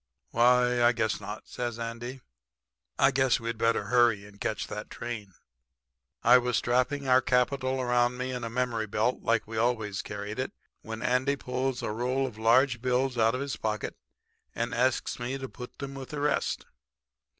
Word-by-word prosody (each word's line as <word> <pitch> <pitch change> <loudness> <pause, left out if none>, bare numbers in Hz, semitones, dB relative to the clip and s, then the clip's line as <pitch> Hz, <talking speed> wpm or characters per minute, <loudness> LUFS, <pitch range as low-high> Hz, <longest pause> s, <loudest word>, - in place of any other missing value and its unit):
"'Why, 125 +1 +4
I 120 +1 +6
guess 110 -3 -1
not,' 105 +2 -7
says 120 -2 -4
Andy. 120 +3 -5 0.8
'I 135 - +5
guess 130 -1 +3
we'd 115 -1 -4
better 115 -2 +2
hurry 115 -1 +3
and 100 0 -16
catch 110 - -1
that 105 - -6
train.' 105 -6 -6 0.9
"I 125 +2 +8
was 125 -1 0
strapping 125 +3 +1
our 130 0 +6
capital 130 +1 +1
around 125 0 +2
me 130 +1 -3
in 125 -1 -4
a 115 - -3
memory 115 -2 -1
belt 110 +5 0
like 115 -1 +1
we 110 +1 -6
always 110 -4 0
carried 105 +2 -6
it, 130 - -2 0.3
when 110 0 -6
Andy 130 +3 +2
pulls 130 -1 -2
a - - -1
roll 125 +4 0
of 115 -5 -7
large 120 +2 +4
bills 130 +1 +1
out 115 0 +3
of 130 - -3
his 140 -1 -3
pocket 110 -1 -2 0.6
and 115 +1 -2
asks 125 +1 +1
me 125 +3 -3
to 135 0 -5
put 125 -1 -10
'em 140 0 -5
with 135 -1 -8
the 150 - -4
rest. 145 0 0
120 Hz, 180 wpm, -29 LUFS, 115-130 Hz, 0.9 s, I